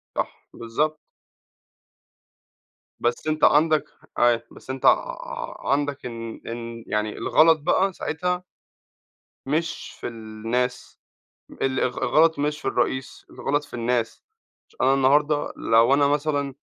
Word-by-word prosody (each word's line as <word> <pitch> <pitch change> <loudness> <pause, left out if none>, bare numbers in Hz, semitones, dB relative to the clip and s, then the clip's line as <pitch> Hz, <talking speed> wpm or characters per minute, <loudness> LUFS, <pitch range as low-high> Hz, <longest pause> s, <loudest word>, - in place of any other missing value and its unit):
صح، - - -4
بالضبط. 150 +7 -1 2.0
بس 120 +5 -1
أنت 155 0 -1
عندك 155 +1 +5 0.3
أيوه، 120 -1 +4
بس - - -16
أنت 130 0 -4
ع - - 0
عندك 145 -1 0
إن 115 -2 -6
إن 115 0 -6
يعني 105 0 -2
الغلط 160 +6 +4
بقى 185 +5 +2
ساعتها 180 +3 -2 1.0
مش 160 +4 -2
في - - -4
الناس، 115 +2 -3 0.6
ال 130 -1 +1
الغ 125 -1 -1
الغلط 160 0 +4
مش 150 +1 -1
في - - -2
الرئيس، 130 +1 -2
الغلط 145 +1 -1
في 145 - -15
الناس، 120 -1 -1 0.4
ش - - -26
أنا 130 +1 +4
النهاردة 145 +2 +2
لو 115 +3 +4
أنا 140 0 +4
مثلًا 145 -1 0
140 Hz, 120 wpm, -24 LUFS, 120-155 Hz, 2.0 s, عندك